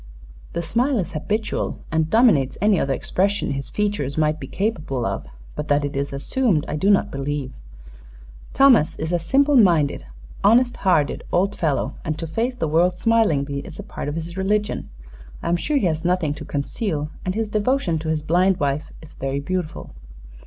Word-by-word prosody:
"The 170 Hz, -, -2 dB
smile 245 Hz, -, +1 dB
is 185 Hz, -, -2 dB
habitual, 210 Hz, +8 st, -2 dB
and 160 Hz, 0 st, +1 dB
dominates 210 Hz, -, +4 dB
any 205 Hz, -2 st, +3 dB
other 135 Hz, -, 0 dB
expression 200 Hz, +4 st, 0 dB
his 135 Hz, -1 st, -4 dB
features 205 Hz, -10 st, -1 dB
might 155 Hz, 0 st, +1 dB
be -, -, -7 dB
capable 155 Hz, -, -2 dB
of; -, -, -3 dB, 0.3 s
but 150 Hz, -, -4 dB
that 145 Hz, 0 st, +2 dB
it 140 Hz, -, -5 dB
is 140 Hz, +1 st, -2 dB
assumed 160 Hz, -, 0 dB
I 150 Hz, -, -3 dB
do 190 Hz, +7 st, +1 dB
not 200 Hz, -, +3 dB
believe. 140 Hz, -1 st, -3 dB, 1.0 s
Thomas 260 Hz, -, +5 dB
is 160 Hz, +3 st, -3 dB
a 175 Hz, -, +2 dB
simple 275 Hz, -, +3 dB
minded, 165 Hz, -, +3 dB, 0.4 s
honest 240 Hz, +4 st, +4 dB
hearted 160 Hz, -7 st, +1 dB
old 195 Hz, +3 st, +1 dB
fellow, 145 Hz, -4 st, 0 dB
and 155 Hz, 0 st, -3 dB
to 165 Hz, -, -4 dB
face 230 Hz, +10 st, -2 dB
the 240 Hz, -, -2 dB
world 175 Hz, +4 st, +2 dB
smilingly 160 Hz, -12 st, +2 dB
is -, -, -9 dB
a -, -, -7 dB
part -, -, -6 dB
of 145 Hz, -, -3 dB
his 165 Hz, +2 st, -6 dB
religion. 205 Hz, -, -1 dB, 0.5 s
I -, -, -1 dB
am 170 Hz, -, +3 dB
sure 285 Hz, -, 0 dB
he 220 Hz, -, +1 dB
has 160 Hz, -1 st, 0 dB
nothing 175 Hz, -4 st, +1 dB
to -, -, -8 dB
conceal, 150 Hz, -, -3 dB
and 185 Hz, +1 st, -2 dB
his 220 Hz, -1 st, -1 dB
devotion 210 Hz, -, 0 dB
to 160 Hz, 0 st, -4 dB
his 155 Hz, -1 st, -1 dB
blind 180 Hz, +4 st, +2 dB
wife 145 Hz, +2 st, -1 dB
is 160 Hz, -, -13 dB
very 135 Hz, +1 st, -3 dB
beautiful." 175 Hz, +2 st, -4 dB
170 Hz, 185 wpm, -22 LUFS, 150-205 Hz, 1.0 s, Thomas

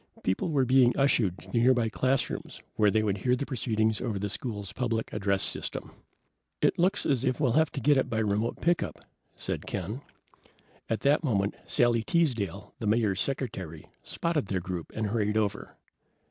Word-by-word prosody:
People 95 Hz, -, 0 dB
were 140 Hz, -4 st, +2 dB
being 125 Hz, -1 st, +4 dB
ushered 115 Hz, -9 st, +2 dB
to -, -, -13 dB
nearby 120 Hz, 0 st, +3 dB
classrooms 130 Hz, +4 st, -1 dB
where 105 Hz, -1 st, +4 dB
they 110 Hz, +1 st, +2 dB
would 100 Hz, -2 st, 0 dB
hear 125 Hz, +4 st, +2 dB
the 140 Hz, -, -3 dB
proceedings 110 Hz, -5 st, 0 dB
over 115 Hz, -5 st, -2 dB
the 100 Hz, 0 st, -3 dB
school's 105 Hz, -7 st, -5 dB
public 115 Hz, -3 st, -2 dB
address 100 Hz, -2 st, +1 dB
system. -, -, -2 dB, 0.7 s
"It -, -, +2 dB
looks 185 Hz, +4 st, +2 dB
as 135 Hz, -4 st, +1 dB
if 130 Hz, -2 st, 0 dB
we'll 135 Hz, -5 st, +2 dB
have 155 Hz, +4 st, +3 dB
to -, -, -3 dB
get 145 Hz, +2 st, +4 dB
it 130 Hz, -, +1 dB
by 110 Hz, -, -2 dB
remote 110 Hz, +1 st, 0 dB
pickup," 175 Hz, +1 st, 0 dB, 0.3 s
said -, -, -4 dB
Ken. 115 Hz, +7 st, -4 dB, 0.9 s
At 115 Hz, -, -1 dB
that 145 Hz, +3 st, +3 dB
moment 100 Hz, -8 st, +1 dB
Sally 120 Hz, -1 st, +3 dB
Teasdale, 115 Hz, -, -1 dB
the -, -, -3 dB
Mayor's 105 Hz, -3 st, +2 dB
secretary, 95 Hz, -, -4 dB, 0.2 s
spotted 165 Hz, -, -2 dB
their 95 Hz, -2 st, -1 dB
group 90 Hz, -1 st, -5 dB
and 110 Hz, -, -1 dB
hurried 105 Hz, 0 st, 0 dB
over. 105 Hz, -1 st, -2 dB
115 Hz, 175 wpm, -28 LUFS, 105-130 Hz, 0.9 s, being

